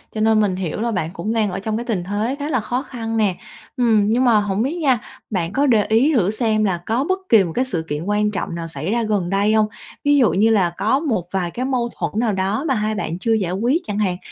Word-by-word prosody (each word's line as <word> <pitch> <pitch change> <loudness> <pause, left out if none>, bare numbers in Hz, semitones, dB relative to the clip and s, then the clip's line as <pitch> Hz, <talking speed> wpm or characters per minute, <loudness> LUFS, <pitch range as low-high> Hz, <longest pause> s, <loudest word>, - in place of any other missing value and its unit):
Cho 215 - -1
nên 220 0 +4
mình 200 -3 +1
hiểu 185 +2 -3
là 235 0 0
bạn 180 -6 -2
cũng 205 +5 -3
đang 215 -3 +1
ở 190 - -3
trong 215 +2 -2
cái 235 - -4
tình 205 -7 -1
thế 210 +7 -2
khá 290 +1 -3
là 255 -5 +1
khó 245 +4 -2
khăn 225 -4 -4
nè. 205 -4 +2 0.4
Ừm, 225 -4 +3
nhưng 240 +4 +2
mà 230 -3 +5
hổng 205 0 -1
biết 280 +6 -2
nha, 270 -8 +2 0.3
bạn 180 -3 -2
có 280 +2 +2
để 225 -6 +4
ý 230 +9 +3
thử 200 -5 +2
xem 215 -1 0
là 190 -4 +1
có 230 +4 0
bất 375 0 +1
kỳ 220 -4 +6
một 170 - -4
cái 255 - +1
sự 170 -10 -3
kiện 150 +1 -3
quan 210 +2 +1
trọng 190 -4 -4
nào 165 -1 -5
xảy 160 +3 -4
ra 235 +1 +1
gần 205 -5 -1
đây 200 +2 +2
hông? 215 -1 +3 0.4
Ví 290 0 +4
dụ 250 -6 +4
như 210 +4 +3
là 195 -6 +3
có 225 +6 +2
một 225 - -1
vài 180 -3 -1
cái 250 +6 -3
mâu 250 -3 0
thuẫn - - -1
nào 230 -3 +1
đó 195 +6 -1
mà 270 - +2
hai 215 0 -1
bạn 175 -4 -3
chưa 225 +3 +1
giải 195 -6 0
quyết 240 - +1
chẳng 205 0 -2
hạn, 185 -4 0
215 Hz, 275 wpm, -20 LUFS, 190-235 Hz, 0.4 s, kỳ